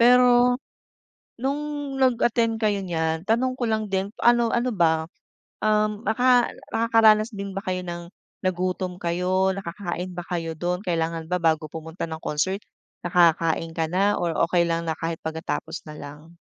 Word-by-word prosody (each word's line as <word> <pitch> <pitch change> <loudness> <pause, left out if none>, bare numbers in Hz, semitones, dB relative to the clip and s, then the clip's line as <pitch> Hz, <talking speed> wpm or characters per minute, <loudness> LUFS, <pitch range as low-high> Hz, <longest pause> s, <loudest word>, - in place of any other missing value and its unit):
Pero 245 0 +6 0.8
nung 290 +2 -3
nag-attend 235 -2 +2
kayo 205 -3 +1
niyan 160 -2 -1
tanong 245 +5 +1
ko 255 - -8
lang 220 -1 0
din, 195 0 -1
ano, 240 -1 +4
ano 240 0 0
ba, 160 -3 +2 0.6
um, 215 0 +1
naka 245 +2 +4 0.2
nakakaranas 225 -1 +4
din 200 -1 -5
ba 195 - -2
kayo 185 0 -1
ng 170 0 -6 0.3
nagutom 185 0 -1
kayo, 180 +2 +1
nakakain 185 -1 -5
ba 175 - -4
kayo 165 -2 -3
do'n? 180 +2 -1
Kailangan 165 -1 -1
ba 180 - +1
bago 160 -1 +2
pumunta 160 +2 -6
ng 160 - -4
concert 190 +7 -1 0.4
nakakain 165 -2 +2
ka 165 -1 0
na 200 +3 +2
or 175 - 0 0.2
okey 175 +1 +2
lang 165 0 -1
na 160 - 0
kahit 165 0 -3
pagkatapos 160 0 -4
na - - -8
lang? 150 +4 -11
185 Hz, 155 wpm, -24 LUFS, 165-225 Hz, 0.8 s, Pero